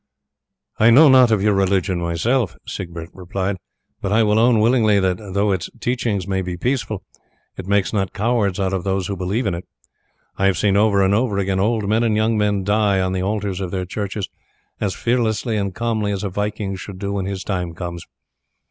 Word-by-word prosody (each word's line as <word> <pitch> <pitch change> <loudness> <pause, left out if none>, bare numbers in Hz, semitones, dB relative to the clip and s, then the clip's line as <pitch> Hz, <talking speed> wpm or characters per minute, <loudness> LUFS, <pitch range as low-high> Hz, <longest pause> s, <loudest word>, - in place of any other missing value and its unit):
"I 110 - +6
know 145 +6 +8
not 130 -2 +7
of 105 -3 +2
your 105 0 +3
religion 95 -2 +1
myself," 85 - 0
Siegbert 85 -2 -7
replied, 95 +1 -3 0.4
"but 100 - -2
I 110 +2 +4
will 105 0 +3
own 115 -1 +4
willingly 110 -2 +4
that 95 -1 +1
though 100 0 -1
its 95 -3 -2
teachings 115 -7 -1
may 95 -1 0
be 90 -1 -4
peaceful, 120 -2 -2 0.5
it 95 - -8
makes 100 +1 +1
not 95 -3 0
cowards 105 -3 0
of 95 -1 -1
those 95 -1 -1
who 100 - -3
believe 95 +7 -2
in 100 - 0
it. 85 +1 -6 0.7
I 95 - +3
have 95 - +2
seen 100 -2 +2
over 100 -1 +4
and 95 +1 +3
over 110 -1 +1
again 95 -1 0
old 105 +1 +1
men 110 +3 +2
and 115 -2 +2
young 110 +1 +2
men 105 -2 +1
die 105 -1 +2
on 95 0 0
the 95 - -1
altars 100 -1 -2
of 95 - -3
their 95 0 -3
churches 100 +1 -4 0.5
as 100 -3 -1
fearlessly 115 -1 0
and 100 -3 -2
calmly 110 -3 -1
as 100 0 -3
a 100 - -1
Viking 105 0 -3
should 95 +1 -8
do 100 +1 -3
when 95 -1 -2
his 95 -1 -4
time 90 -4 -3
comes. 85 -1 -6
100 Hz, 200 wpm, -20 LUFS, 95-110 Hz, 0.7 s, know